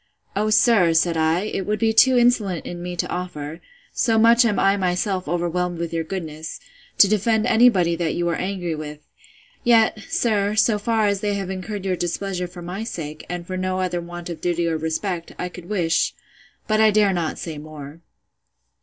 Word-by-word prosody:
O 210 +2 +1
sir, 215 -6 +4
said 165 +1 +2
I, 160 +2 +2
it 195 -2 -4
would 210 0 0
be 225 0 +1
too 255 +3 +6
insolent 220 -8 +2
in 175 0 -6
me 180 0 -5
to - - -2
offer 165 -3 -5 0.3
(so 225 -2 +1
much 230 +2 +6
am 210 -4 +1
I 195 0 +3
myself 185 -1 -1
overwhelmed 175 +1 -1
with 170 0 -4
your 165 0 -1
goodness,) 160 -3 -6 0.4
to 200 - +7
defend 215 +2 +1
any 245 0 +6
body 175 -6 +1
that 165 -2 -1
you 175 0 -1
are 170 - 0
angry 185 -3 -3
with: 150 -1 -7 0.6
Yet, 225 -2 +4
sir, 210 -3 +1
so 215 -1 +3
far 220 0 +1
as 200 -1 +1
they 205 -1 -1
have 195 -1 -3
incurred 190 +1 -5
your 185 -1 0
displeasure 180 +1 -3
for 175 0 -11
my 185 +5 -5
sake, 155 -9 -7
and 175 0 -5
for 185 +1 -5
no 185 0 -1
other 180 -2 -1
want 175 0 -8
of 170 - -8
duty 175 -1 0
or 165 - 0
respect, 165 +2 -3
I 180 - -3
could 175 -1 -12
wish—But 210 +3 -2
I 220 - +6
dare 205 -2 +3
not 170 -3 -2
say 160 -3 -6
more. 150 0 -10
180 Hz, 195 wpm, -22 LUFS, 170-210 Hz, 0.6 s, to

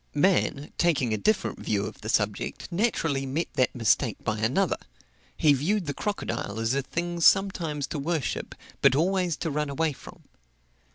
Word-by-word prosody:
Man, 150 -3 +1
taking 140 -9 +2
a - - +1
different 210 - 0
view 100 -1 -1
of - - -8
the 110 - -5
subject, 105 - -1
naturally 165 - 0
met 150 +6 -2
that 130 - +1
mistake 115 -4 +2
by 110 0 -1
another; 130 - +1 0.6
he 150 -2 +5
viewed 175 +8 0
the 145 - -2
crocodile 135 - -3
as 115 +2 +1
a 140 - +1
thing 170 +5 -3
sometimes 165 -7 +3
to 145 - -5
worship, 155 -1 -2 0.3
but 135 -1 +5
always 180 0 +1
to 165 - -3
run 150 0 -1
away 155 +2 0
from. - - -14
150 Hz, 165 wpm, -27 LUFS, 130-175 Hz, 0.6 s, he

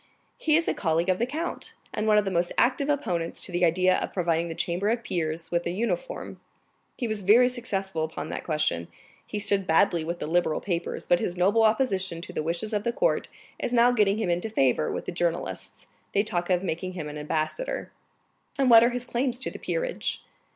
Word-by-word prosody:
"He 310 -1 +3
is 330 +1 +2
a - - +2
colleague 165 0 0
of 185 - +2
the 235 - +1
count, 320 +6 -4 0.2
and 215 - -1
one 210 -1 +5
of 210 - +3
the 195 - -1
most 175 0 +1
active 270 +3 +2
opponents 175 - -1
to - - -4
the 175 +1 0
idea 185 +2 +4
of - - -4
providing 170 -2 0
the 165 - -5
Chamber 180 +4 -1
of 230 +1 0
Peers 165 -4 -3
with 170 0 +1
a - - 0
uniform. 370 - -3 0.6
He 240 - -2
was 215 -2 -2
very 220 +6 +6
successful 195 -9 -2
upon 160 0 -5
that - - -4
question. 150 - -1 0.4
He - - -4
stood 200 -2 +1
badly 165 0 +3
with 170 +2 -3
the - - -4
Liberal 160 0 +1
papers, 175 -3 -3
but 175 - +3
his 180 - -3
noble 200 +5 +3
opposition 200 -6 +1
to - - -9
the - - -1
wishes 170 +7 -2
of 205 -1 0
the 235 - 0
court - - +1 0.3
is 240 - -2
now 240 +1 +5
getting 210 -4 +3
him 215 -5 0
into 175 +6 -1
favor 130 - +2
with - - -4
the - - -3
journalists. 175 -1 -3 0.3
They 200 - +4
talk 175 -4 -1
of 180 0 +2
making 185 +1 -3
him 165 -4 -5
an 150 0 -6
ambassador." 160 - -3 0.7
30303m - - -21
"And 265 -2 +4
what 230 0 +9
are 235 - +5
his 245 0 -4
claims 250 0 -1
to 265 - -4
the - - -9
peerage?" - - -2
190 Hz, 220 wpm, -26 LUFS, 170-235 Hz, 0.7 s, what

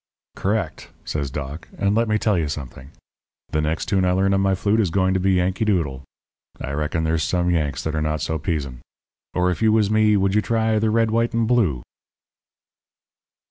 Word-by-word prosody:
"'Correct,' 100 -6 -2 0.2
says 70 -3 -2
Doc. 70 +3 -6
'And 100 0 +1
let 115 +2 +2
me 110 0 +2
tell 105 -1 +1
you 80 -4 0
something: 70 -2 -7 0.6
The 80 - 0
next 80 +3 -1
tune 95 -2 +1
I 90 0 +2
learn 95 +1 +2
on 95 - +2
my 95 0 +2
flute 100 +4 +1
is 100 -5 +2
going 95 +2 +1
to 95 - +1
be 95 +1 +2
"Yankee 95 +3 +1
Doodle." 80 -11 0 0.6
I 70 - -5
reckon 75 +3 -1
there's 80 0 0
some 90 +2 +1
Yanks 75 -6 -1
that 80 - -2
are 80 - -1
not 75 0 -1
so 80 +2 -2
pizen. 70 -6 -3 0.5
Or, 90 0 +2
if 90 - -4
you 110 -1 +4
was 110 -2 +2
me, 110 -1 +4
would 95 0 +1
you 105 - +3
try 110 -1 +1
"The 110 0 +1
Red, 115 0 +2
White, 115 +1 +1
and 115 -1 +1
Blue"?'" 95 - +1
90 Hz, 205 wpm, -22 LUFS, 75-105 Hz, 0.6 s, you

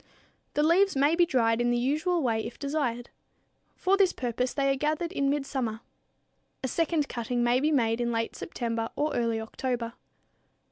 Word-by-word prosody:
The 295 - +3
leaves 370 +4 +4
may 285 +4 +3
be 345 0 +4
dried 230 -5 +2
in 240 - +2
the 240 - +2
usual 310 +7 +1
way 225 -3 +1
if - - -7
desired. 275 -5 -2 0.6
For 385 +2 +2
this 380 -2 +4
purpose 250 0 -2
they 275 -1 +1
are - - -2
gathered 305 +5 -1
in 280 -6 0
midsummer. 265 -6 -2 0.8
A - - 0
second 320 +1 0
cutting 240 0 -2
may 240 +1 +3
be 300 +3 +2
made 235 -4 +2
in 240 0 0
late 230 0 -2
September 230 -6 -3
or 300 +1 0
early 230 -2 0
October. 235 +1 -3
260 Hz, 175 wpm, -28 LUFS, 235-305 Hz, 0.8 s, leaves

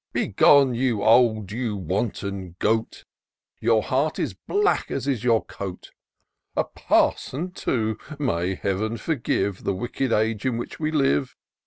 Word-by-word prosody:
Begone, 140 -3 +4
you 120 -4 0
old, 110 -4 +4
you 115 -1 -2
wanton 95 -1 -3
goat! 110 +3 -1 0.5
Your 115 -2 +3
heart 145 +4 0
is - - -2
black 410 0 0
as 135 0 -3
is 130 -5 -1
your 115 -2 +2
coat! 95 -3 -7 0.7
A - - +3
parson 170 +8 0
too! 110 -10 -1 0.2
may 95 - -1
Heaven 105 +5 -2
forgive 105 - -1
The 100 - 0
wicked 120 +5 -2
age 110 -1 +1
in 130 -3 0
which 120 - -6
we 155 -1 0
live! 135 -3 +1
115 Hz, 140 wpm, -24 LUFS, 100-130 Hz, 0.7 s, Begone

